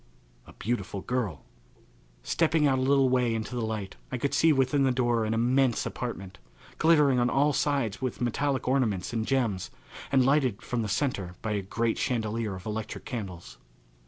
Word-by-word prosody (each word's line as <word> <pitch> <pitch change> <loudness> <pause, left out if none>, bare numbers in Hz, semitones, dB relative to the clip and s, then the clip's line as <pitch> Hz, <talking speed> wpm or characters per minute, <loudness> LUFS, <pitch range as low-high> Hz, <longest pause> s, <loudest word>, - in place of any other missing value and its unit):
A - - -13
Beautiful 100 -4 -3
Girl! 115 - -3 0.8
Stepping 160 - +2
out 135 -2 +3
a - - 0
little 135 0 +4
way 125 -2 +2
into 110 +2 -4
the 120 - -2
light 110 -3 -4
I 130 - -1
could 140 +3 -1
see 160 - +5
within 135 0 +2
the 135 - +3
door 120 -3 +1
an 110 +1 0
immense 125 +1 +2
apartment, 100 -6 -5 0.4
glittering 150 -5 +4
on 120 0 +2
all 145 +3 +2
sides 135 -9 0
with 130 -1 -3
metallic 130 +2 -1
ornaments 120 -8 0
and 110 -1 -1
gems 115 -9 0 0.4
and 130 -2 +4
lighted 130 -6 +2
from 120 -1 -2
the 110 - -2
centre 100 -8 -1
by 110 - -2
a 105 -1 0
great 115 +4 -1
chandelier 110 -4 -1
of 95 - -10
electric 110 0 -5
candles. 95 -8 -7
120 Hz, 175 wpm, -28 LUFS, 110-135 Hz, 0.8 s, see